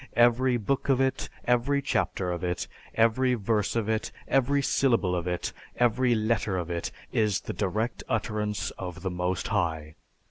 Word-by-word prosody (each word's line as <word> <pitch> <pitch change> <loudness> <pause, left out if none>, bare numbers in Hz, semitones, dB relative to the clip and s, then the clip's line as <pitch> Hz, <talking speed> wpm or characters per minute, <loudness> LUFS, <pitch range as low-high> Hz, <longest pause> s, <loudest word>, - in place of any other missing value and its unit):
Every 120 +2 +4
book 135 +6 -1
of 135 -2 +4
it, 130 0 0 0.2
every 125 +4 +2
chapter 95 -9 -1
of 85 0 -4
it, 90 0 -1 0.3
every 125 +3 +3
verse 105 -1 0
of 115 -2 0
it, 110 0 -1 0.2
every 140 +1 +2
syllable 115 -10 +2
of 90 0 -2
it, 90 -1 -2 0.2
every 120 +1 +3
letter 110 -3 0
of 85 -1 -3
it, 85 -1 -2 0.2
is 105 -4 +1
the - - -5
direct 110 +4 -1
utterance 105 -1 -1
of 90 -1 -6
the 95 - -1
Most 90 +1 -1
High. 80 -7 -1
110 Hz, 165 wpm, -28 LUFS, 90-125 Hz, 0.3 s, Every